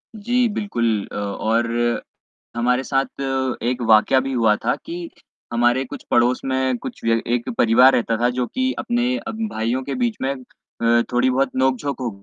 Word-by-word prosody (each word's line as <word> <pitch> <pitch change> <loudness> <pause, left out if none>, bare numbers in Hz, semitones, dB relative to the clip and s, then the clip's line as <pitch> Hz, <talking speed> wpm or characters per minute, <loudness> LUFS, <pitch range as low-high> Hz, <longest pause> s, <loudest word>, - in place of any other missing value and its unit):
जी, 240 +3 +1
बिल्कुल। 115 - -1
अ, - - -8
और 115 +3 0 0.5
हमारे 125 +2 +1
साथ 135 0 -2 0.4
एक 125 +1 -1
वाकया 110 +4 +5
भी 135 +1 -3
हुआ 115 -4 +3
था - - +2
कि 170 0 -6 0.4
हमारे 120 +2 +2
कुछ - - -9
पड़ोस 120 +1 +3
में 130 -1 0
कुछ - - -8
व्य 115 0 +2
एक 120 -1 -1
परिवार 120 +3 +6
रहता 115 -1 +1
था, 120 - +3
जो 125 0 -1
कि 260 0 -1
अपने 245 +1 0
अ, - - -6
भाइयों 130 - -2
के 140 - -4
बीच 240 -3 -1
में 135 +1 0
अ, 120 -2 -1
थोड़ी 125 +1 +2
बहुत 130 +1 +1
नोकझोंक 130 +2 0
हो। 120 - -1
125 Hz, 170 wpm, -21 LUFS, 120-140 Hz, 0.5 s, परिवार